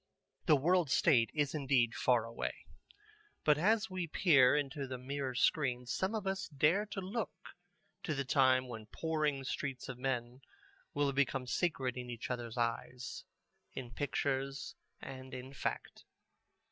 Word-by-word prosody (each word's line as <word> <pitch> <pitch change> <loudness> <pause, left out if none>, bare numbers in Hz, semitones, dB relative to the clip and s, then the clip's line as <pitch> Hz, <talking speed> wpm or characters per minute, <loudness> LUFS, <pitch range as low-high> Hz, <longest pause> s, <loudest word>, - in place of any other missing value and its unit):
The 155 - +7
World 170 +3 +3
State 130 -6 +4
is 145 -3 0
indeed 130 -6 +2
far 120 -3 +2
away. 115 0 -5 0.8
But 150 -1 +4
as 215 +5 +3
we 185 -3 -3
peer 145 -6 +5
into 140 -1 -2
the 130 0 -4
Mirror 130 0 -3
Screen 125 -2 +2
some 190 - -1
of 210 -3 -3
us 190 +1 -1
dare 160 +8 +2
to 195 -1 -4
look 200 +6 -2
forward - - -19
to 155 - -1
the 140 0 -1
time 130 -1 +4
when 110 -3 -7
the 105 - -37
pouring 155 -4 0
streets 130 0 -4
of 125 -2 -6
men 125 -1 -2 0.5
will 145 -1 +2
become 135 -1 +1
sacred 130 -3 -1
in 125 0 -5
each 120 +1 -5
other's 120 -1 -4
eyes, 120 0 -3 0.5
in 125 -2 -6
pictures 140 0 -2 0.3
and 130 -1 -8
in 130 +2 -8
fact. - - -4
135 Hz, 155 wpm, -34 LUFS, 125-155 Hz, 0.8 s, The